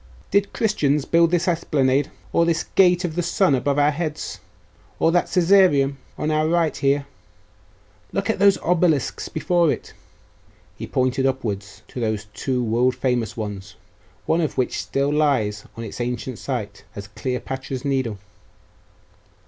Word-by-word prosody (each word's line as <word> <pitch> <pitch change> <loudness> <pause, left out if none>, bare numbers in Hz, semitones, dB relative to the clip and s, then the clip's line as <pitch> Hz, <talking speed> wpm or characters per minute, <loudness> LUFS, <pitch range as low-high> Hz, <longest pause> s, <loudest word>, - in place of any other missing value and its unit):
Did 200 0 +2
Christians 150 - +1
build 170 0 +4
this 175 +1 +1
esplanade, 145 -5 +1 0.2
or 170 - +4
this 170 -1 +1
gate 180 -1 +4
of 165 - -3
the 175 - -1
Sun 175 -1 +2
above 140 +2 +1
our 145 +1 +4
heads? 155 0 -4 0.6
Or 165 - +3
that 175 +1 +2
Caesareum 170 -7 +4 0.2
on 155 - -1
our 155 0 +2
right 165 -1 +1
here? 140 0 +1 1.1
Look - - -2
at - - 0
those 200 0 +5
obelisks 165 -5 +1
before 170 0 +2
it!' - - -5
And - - -21 0.8
he - - -7
pointed 130 +1 +1
upwards 105 -7 -4
to - - -7
those 110 -2 -1
two 125 +4 -1
world 120 +3 +1
famous 120 -3 -1
ones, 100 -3 -6 0.5
one 165 +2 +2
of 155 - -2
which 130 - 0
still 140 +1 -1
lies 125 -9 +1
on 115 - -5
its 115 +2 -6
ancient 125 0 -4
site, 120 -7 -4
as 100 0 -7
Cleopatra's 130 +3 -4
Needle. 130 -6 -1
140 Hz, 150 wpm, -22 LUFS, 125-170 Hz, 1.1 s, those